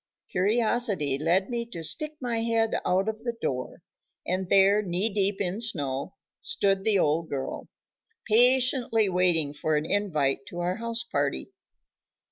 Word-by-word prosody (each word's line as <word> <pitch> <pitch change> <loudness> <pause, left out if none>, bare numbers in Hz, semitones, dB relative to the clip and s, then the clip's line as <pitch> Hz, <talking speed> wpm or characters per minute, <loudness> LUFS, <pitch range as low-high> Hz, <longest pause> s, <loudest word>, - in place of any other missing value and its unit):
Curiosity 205 - +1
led 180 +7 +1
me 235 -1 -1
to 170 -8 -7
stick 305 - -1
my 240 -3 -2
head 225 -1 0
out 185 +3 +1
of 220 +1 -4
the 235 -1 -4
door, 125 -1 -4 0.4
and 185 0 -2
there, 200 +2 +5
knee 195 +2 +1
deep 200 -1 +1
in 195 +2 -2
snow, 140 - -2 0.2
stood 195 - 0
the 215 -1 +2
old 160 -1 +1
girl, 135 -2 -5 0.6
patiently 245 -1 +3
waiting 175 -5 +1
for 155 +1 -1
an 150 +1 0
invite 155 -9 -1
to 175 - -9
our 175 +1 -1
house 230 0 -3
party. 145 - -2
195 Hz, 145 wpm, -26 LUFS, 165-225 Hz, 0.6 s, there